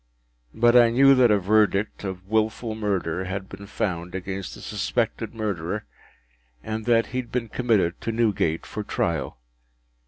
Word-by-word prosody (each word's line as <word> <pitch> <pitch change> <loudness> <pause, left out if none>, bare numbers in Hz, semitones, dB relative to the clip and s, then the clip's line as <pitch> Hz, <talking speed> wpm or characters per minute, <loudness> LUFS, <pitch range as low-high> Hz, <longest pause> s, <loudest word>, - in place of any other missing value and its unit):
But 120 +1 +4
I 120 -1 +7
knew 135 +4 +6
that 130 -2 +5
a 105 - +5
verdict 105 +1 +1
of 95 -1 -6
Wilful 110 +1 0
Murder 95 -5 -2
had 95 +1 -4
been 100 +1 -10
found 90 -3 -3
against 95 0 -5
the - - -12
suspected - - -2
murderer, 105 -2 -3 0.8
and 110 0 -4
that 115 -1 +3
he 130 - 0
had 120 -2 -7
been 120 -2 -2
committed 105 -9 +1
to 115 - -2
Newgate 105 -8 0
for 105 - -5
trial. 85 -9 -2
105 Hz, 155 wpm, -24 LUFS, 95-115 Hz, 0.8 s, I